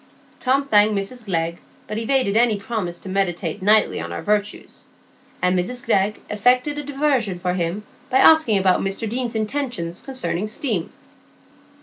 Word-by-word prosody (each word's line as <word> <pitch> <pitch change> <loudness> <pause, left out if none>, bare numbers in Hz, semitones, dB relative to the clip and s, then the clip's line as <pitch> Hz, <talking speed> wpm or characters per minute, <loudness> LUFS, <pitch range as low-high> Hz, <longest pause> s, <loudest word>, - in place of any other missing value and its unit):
Tom 270 +2 +1
thanked 210 -2 +4
Mrs 215 +4 -4
Glegg, 170 -3 -2 0.3
but 215 +1 -4
evaded 240 -3 +1
any 230 -2 +3
promise 200 -4 -4
to - - -12
meditate 185 -1 -2
nightly 210 +2 +3
on - - -5
her - - -6
virtues; 210 0 -2 0.6
and 180 0 +3
Mr 240 +8 -2
Glegg 210 -1 +1
effected 250 +7 +1
a - - -5
diversion 270 -8 0
for 180 0 -2
him 180 +3 -2 0.3
by 260 - +2
asking 290 -7 +6
about 190 -1 +3
Mr 195 +3 -2
Deane's 240 +1 -3
intentions 215 -7 -3
concerning 255 -7 -3
steam. 215 - -2
210 Hz, 150 wpm, -21 LUFS, 190-250 Hz, 0.6 s, asking